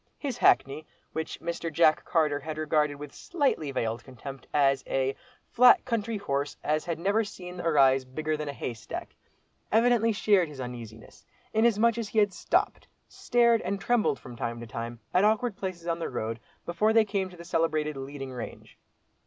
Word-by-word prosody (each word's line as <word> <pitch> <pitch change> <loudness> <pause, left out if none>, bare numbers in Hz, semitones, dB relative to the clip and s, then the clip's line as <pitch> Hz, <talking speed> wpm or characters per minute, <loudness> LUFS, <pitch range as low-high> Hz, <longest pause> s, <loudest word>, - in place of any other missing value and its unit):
His 275 -5 -4
hackney, 145 +3 +3 0.3
which 160 - -4
Mr. 170 0 -4
Jack 155 0 +4
Carter 155 -4 +1
had 155 +1 -6
regarded 150 -1 +1
with 145 0 -9
slightly 280 - -1
veiled 115 -3 -2
contempt 135 +1 -10
as 135 -2 +3
a 135 0 0 0.4
"flat 250 +1 +6
country 230 -3 -1
horse, 140 -7 -2
as 155 +1 0
had 170 -2 -2
never 200 +6 +1
seen 180 -3 -9
a 170 - 0
rise 135 -3 +4
bigger 155 +4 -3
than 150 -1 -4
a - - -1
haystack," 120 -5 -6 0.6
evidently 230 0 +4
shared 205 -4 +3
his 145 -3 -11
uneasiness, 115 -3 -9 0.3
inasmuch 230 +1 +3
as 220 -3 -4
he 220 - -6
had 205 -2 +4
stopped, - - 0 0.2
stared 235 -1 +2
and 200 0 -2
trembled 220 - +1
from 125 - -11
time 115 0 -4
to 120 - -7
time, 115 +1 -6
at 180 - +4
awkward 220 +1 +2
places 185 -4 -5
on 170 -1 -1
the 165 - -3
road, 115 -2 -3 0.3
before 210 +6 +1
they 225 -1 +5
came 195 -2 -2
to 180 - -14
the 170 - -10
celebrated 155 -3 0
"leading 135 0 -6
range." 120 -2 -9
160 Hz, 175 wpm, -28 LUFS, 135-205 Hz, 0.6 s, flat